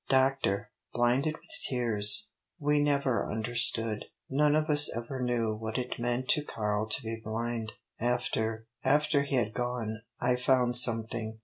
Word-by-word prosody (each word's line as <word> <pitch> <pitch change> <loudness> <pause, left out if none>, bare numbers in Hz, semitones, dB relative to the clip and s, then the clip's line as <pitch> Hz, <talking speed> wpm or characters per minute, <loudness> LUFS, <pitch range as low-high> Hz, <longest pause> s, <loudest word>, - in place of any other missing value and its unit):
"Doctor," 130 -5 +1 0.2
blinded 125 +6 +1
with 320 - -19 0.2
tears 120 - +2 0.3
"we 150 -2 +1
never 140 -4 0
understood. 110 -1 +2 0.3
None 150 +2 +3
of 155 0 +1
us 150 -1 +6
ever 125 +3 -5
knew 120 -3 0
what 110 +1 -5
it 125 -1 -4
meant 120 +2 -2
to 150 - +4
Karl 105 -4 -2
to 110 +5 +1
be 115 0 -5
blind. 115 0 -4 0.3
After 115 -2 -1 0.2
after 145 +1 +2
he 140 -1 -2
had 110 -4 0
gone 120 -3 -4 0.2
I 125 0 +1
found 125 -1 +2
something. 115 -2 +2
120 Hz, 145 wpm, -29 LUFS, 110-135 Hz, 0.3 s, us